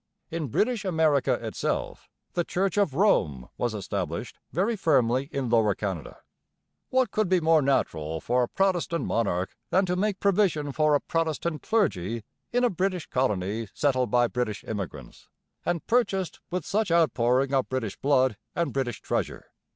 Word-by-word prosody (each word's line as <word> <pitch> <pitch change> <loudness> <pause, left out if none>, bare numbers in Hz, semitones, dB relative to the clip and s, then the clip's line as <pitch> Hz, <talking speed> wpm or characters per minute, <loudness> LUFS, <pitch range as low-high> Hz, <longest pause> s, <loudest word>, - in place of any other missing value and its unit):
In 165 -2 -2
British 220 - 0
America 160 -7 +2
itself - - -3 0.2
the 175 - +1
Church 190 +4 -1
of 200 -10 +1
Rome 75 - +2
was 120 -3 -1
'established' 95 -5 -4
very 200 +8 +1
firmly 135 - +2
in 135 -2 -2
Lower 110 -4 +3
Canada. 95 -7 -4 0.7
What 255 -5 +2
could 215 -4 0
be 185 -1 +4
more 160 -1 +4
natural 80 - 0
for 125 +8 +1
a 120 - +1
Protestant 175 -2 0
monarch 95 -5 -1
than 190 +1 +3
to 180 0 0
make 200 +1 0
provision 185 -7 +2
for 155 +1 +3
a 145 - +1
'Protestant 165 -1 -1
Clergy' 115 - 0 0.3
in 245 +1 +2
a 245 - +3
British 185 -2 -1
colony 105 -3 0
settled 130 -4 +1
by 120 -1 +4
British 120 -3 -2
immigrants, 100 -6 -6 0.4
and 175 -2 -1
purchased 200 -7 +1
with 180 -3 -3
such 215 0 0
outpouring 135 -5 +2
of 135 -1 +1
British 125 -6 -2
blood 130 -5 +2 0.2
and 170 -1 -1
British 130 -4 -2
treasure? - - -3
145 Hz, 155 wpm, -27 LUFS, 115-185 Hz, 0.7 s, be